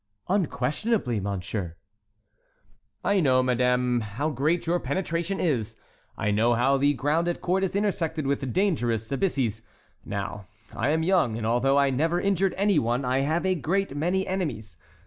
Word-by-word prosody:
"Unquestionably, 165 - 0
Monsieur." 95 -2 -4 1.3
"I 200 -1 +2
know, 130 -6 +3
Madame, 125 0 +2
how 115 +9 -3
great 155 +6 0
your 175 +1 +1
penetration 170 +5 -2
is; 115 - -1 0.4
I 105 - 0
know 115 +3 +3
how 135 +4 +3
the 145 +1 +2
ground 150 +6 0
at 175 - -1
court 185 +2 0
is 190 - -1
intersected 175 -7 -1
with 135 -2 -1
dangerous 120 - 0
abysses. 135 - 0 0.4
Now, 100 -1 -5 0.3
I 125 - 0
am 160 +2 +1
young, 165 - +2
and 115 - -4
although 125 +4 +2
I 140 -1 +3
never 165 +6 +1
injured 195 0 +1
any 200 0 +3
one, 120 +3 -1
I 130 +1 +1
have 155 +6 0
a 190 - +3
great 185 0 -1
many 180 +6 0
enemies. 140 - -3
140 Hz, 155 wpm, -26 LUFS, 120-175 Hz, 1.3 s, know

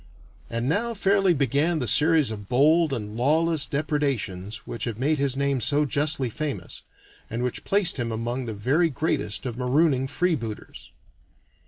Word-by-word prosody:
And 115 +1 -2
now 230 - 0
fairly 195 -1 +3
began 145 +3 +1
that 125 -5 -1
series 155 +1 +4
of 105 -2 -8
bold 155 +5 +4
and 105 -5 -4
lawless 155 +5 +2
depredations 130 -10 -2
which 115 -2 -4
have 115 -3 -4
made 145 +4 0
his 135 -1 0
name 140 -2 0
so 145 +6 +2
justly 145 -2 +1
famous, 140 +5 -5 0.5
and 115 +2 -3
which 125 - -3
placed 195 -5 +1
him 120 -2 -2
among 120 +3 -3
the 110 - -3
very 140 +11 +2
greatest 140 -6 -2
of 120 -1 -5
marooning 135 +1 +2
freebooters. 140 -9 -3
140 Hz, 155 wpm, -25 LUFS, 120-155 Hz, 0.5 s, series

